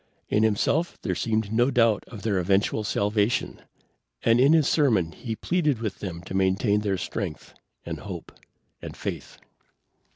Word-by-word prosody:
In 105 - +2
himself 110 +10 +1
there - - 0
seemed 110 -2 -1
no 120 +3 +3
doubt 115 -5 +3
of 110 -5 -10
their 105 -4 +1
eventual 100 +4 +1
salvation, 105 +2 0 0.6
and 115 +1 +4
in 135 +3 +6
his 155 -3 +4
sermon 110 - +2
he 115 +7 -5
pleaded 155 -1 0
with 110 -2 -4
them 85 -3 -6
to 95 - -8
maintain 95 +3 +2
their 100 -2 0
strength 90 -4 -5 0.3
and - - -5
hope - - -8 0.5
and - - -8
faith. - - -6
110 Hz, 155 wpm, -26 LUFS, 100-120 Hz, 0.6 s, in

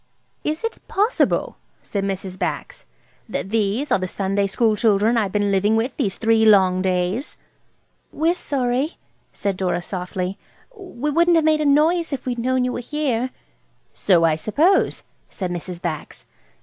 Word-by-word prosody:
"Is 310 +5 -2
it 455 - -3
possible," 425 +5 +1 0.3
said 200 -2 -3
Mrs. 190 -1 -4
Bax, - - -4 0.4
"that 195 - -4
these 225 +6 0
are - - +4
the 185 - -2
Sunday 195 +1 -1
school 220 +2 +2
children 215 +1 +3
I've 210 -5 +1
been 205 0 +1
living 200 +3 +2
with 235 +4 -1
these 195 -2 -1
three 225 0 +3
long 190 -4 +5
days?" 185 - -1 0.7
"We're 325 +3 +1
sorry," 270 -2 -1 0.3
said 200 -2 -2
Dora, 180 -2 -1
softly; 180 +1 -4 0.4
"we 300 - -4
wouldn't 340 +3 +4
have 320 -1 +3
made 310 -1 +3
a - - 0
noise 315 +4 +3
if 275 - -4
we'd 245 -2 -2
known 255 +1 +1
you 250 - -1
were - - -3
here." 260 -2 -1 0.6
"So 175 -4 +3
I 160 -2 +3
suppose," 305 - +2 0.3
said 185 -2 -4
Mrs. 175 0 -5
Bax. 165 -4 -5
220 Hz, 160 wpm, -21 LUFS, 190-285 Hz, 0.7 s, long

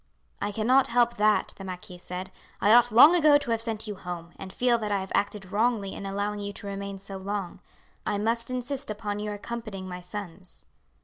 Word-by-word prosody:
"I 205 - -1
cannot 245 +6 +3
help 240 0 +2
that," 210 0 +3
the 195 - -8
marquis 180 -1 -8
said. 180 +1 -6 0.3
"I 210 - +5
ought 245 0 +6
long 285 +10 +9
ago 305 -4 +6
to 265 -5 -3
have 225 -1 +1
sent 225 -1 -3
you 210 - -4
home, 175 -3 -7
and 190 - -8
feel 240 +1 +2
that 210 -2 -3
I 200 - +2
have 190 0 -5
acted 200 -2 -1
wrongly 215 -2 +1
in 200 - -6
allowing 205 +1 -2
you 200 0 -4
to 200 - -9
remain 200 0 -5
so 195 0 -8
long. 195 -1 -4 0.4
I 205 - -1
must 230 +3 0
insist 255 +2 -3
upon 210 -1 -3
your 210 0 -3
accompanying 210 -3 -6
my 180 0 -6
sons." 185 0 -8
205 Hz, 205 wpm, -27 LUFS, 195-230 Hz, 0.4 s, long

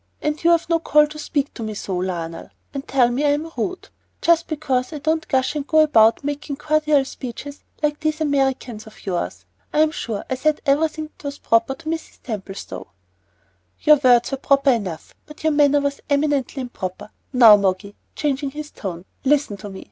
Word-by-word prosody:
"And 300 +1 -2
you've 340 0 +4
no 335 -1 +2
call 300 -2 +4
to 305 +1 -10
speak 285 -2 -2
to - - -9
me 215 -1 -4
so, 195 -2 -4
Lionel, 170 -2 -4 0.2
and 275 -1 -6
tell 255 -3 +3
me 250 +4 -1
I 290 -1 +4
am 315 +3 -3
rude, 365 +10 -4 0.3
just 335 0 +3
because 265 -5 -1
I - - -4
don't 315 +2 -1
gush 265 +1 +1
and 290 -1 -3
go 315 0 +5
about 230 -6 +4
making 290 0 -4
cordial 305 -1 +2
speeches 265 +3 -8 0.2
like 295 0 +1
these 310 0 -1
Americans 265 -7 -1
of 215 - -15
yours. 95 - -3 0.3
I'm 310 +1 +3
sure 225 -9 -4
I - - -2
said 300 +4 +1
everything 310 +2 +1
that - - -17
was 285 0 -4
proper 230 +4 +2
to 330 - -18
Mrs. 325 0 -4
Templestowe." 200 -4 -6 0.9
"Your 300 0 +6
words 245 -3 +4
were 270 - -1
proper 275 0 +3
enough, 190 -9 -3
but 300 - -13
your 315 -1 +2
manner 290 -1 +4
was 280 0 -2
eminently 285 -2 0
improper. 190 -5 -6 0.2
Now, 235 -5 +8
Moggy," 200 0 -1 0.2
changing 280 -1 -1
his 300 +2 -8
tone, 180 -3 -6 0.2
"listen 280 -5 +2
to 205 +1 -8
me. 190 -1 -9
280 Hz, 185 wpm, -21 LUFS, 230-300 Hz, 0.9 s, Now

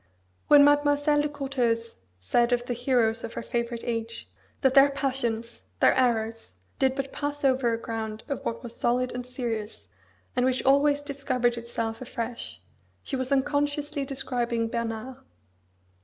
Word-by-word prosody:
When 290 -1 +8
Mademoiselle 290 0 +3
de 295 - -1
Courteheuse 250 -5 -1 0.2
said 235 - +2
of 245 0 +1
the 245 - -2
heroes 235 -2 +1
of 225 - -5
her - - -5
favourite 235 0 -3
age, 230 -1 -3 0.3
that 265 -2 +3
their 275 +1 +7
passions, 240 -4 -2 0.2
their - - +6
errors, 225 - 0 0.3
did 265 0 +2
but 275 0 -4
pass 290 0 -3
over 260 -3 +3
a 230 - 0
ground 220 -1 -5
of 280 - -4
what 230 - -3
was 235 -1 -7
solid 250 +1 +1
and 250 0 -5
serious, 225 - -4 0.5
and 250 - +2
which 255 0 +1
always 285 +2 +4
discovered 270 -4 0
itself 230 -1 -4
afresh, 235 -2 -5 0.4
she 275 - -3
was 260 +1 -2
unconsciously 290 +1 0
describing 245 -4 -1
Bernard. 230 +2 -4
250 Hz, 150 wpm, -27 LUFS, 230-275 Hz, 0.5 s, When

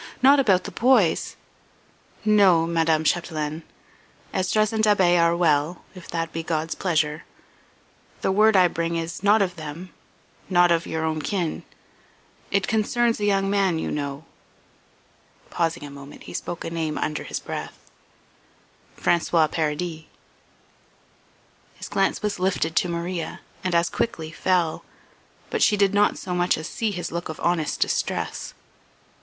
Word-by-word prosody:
"Not 275 +2 +7
about 195 -8 +3
the - - -7
boys?" 230 -9 +2 0.9
"No, 195 -6 +5
Madame 165 -1 +1
Chapdelaine. 155 -2 -1 0.7
Esdras 215 +3 +1
and 220 0 0
Da'Be 190 -5 +4
are 170 0 +3
well, 160 0 +1
if 185 -2 -12
that 165 -1 -3
be 165 - -2
God's 160 -1 -2
pleasure. 155 -3 0 1.0
The - - +1
word 215 +2 +4
I 185 -1 +6
bring 170 0 -2
is 165 +1 -4
not 205 +1 +4
of 180 -2 -4
them 155 +3 -8 0.6
not 175 -2 +4
of 165 -1 +1
your 160 0 -2
own 155 -1 -1
kin. 175 -2 -2 0.9
It 200 -1 +1
concerns 230 +2 +1
a 205 - 0
young 195 -1 +2
man 195 -4 +2
you - - -3
know." 145 +1 -4 1.3
Pausing 165 -2 -1
a 145 - -8
moment 140 0 -11
he - - -10
spoke 175 - -5
a 165 - -4
name 160 -2 -2
under 150 -1 -2
his - - -4
breath: - - -8 1.1
"François 165 -2 +2
Paradis." 160 +1 -2 1.7
His - - -9
glance - - 0
was 210 -3 -2
lifted 180 -3 0
to 180 - +2
Maria 170 0 -4 0.2
and 185 -2 0
as 170 0 +3
quickly 160 -9 -3
fell, 175 -2 0 0.7
but - - -1
she 210 - +4
did 200 -1 +3
not 205 0 +3
so 180 - -5
much 175 0 +2
as 155 - -5
see 225 - -2
his 175 -4 -4
look 170 0 -4
of 160 - -6
honest 170 -3 0
distress. - - -2
170 Hz, 150 wpm, -24 LUFS, 160-195 Hz, 1.7 s, Not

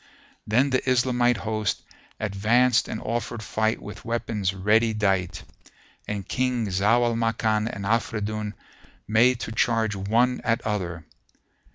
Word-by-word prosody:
Then 125 +6 +2
the 130 - +2
Islamite 125 -1 +2
host 110 0 -2 0.4
advanced 110 +4 +2
and 110 - -4
offered 115 -1 -3
fight 110 +2 0
with 105 - -10
weapons 115 -4 -1
ready 110 +4 +2
dight, 95 -4 0 0.6
and 100 -2 -4
King 125 -3 0
Zau 105 +6 +3
al 120 - +1
Makan 110 -1 0
and 100 -1 -6
Afridun 110 -1 -1 0.5
made 115 +3 +4
to - - -4
charge 110 -2 +1
one 115 +6 +1
at 115 0 +1
other. 90 -6 -3
110 Hz, 130 wpm, -25 LUFS, 105-120 Hz, 0.6 s, made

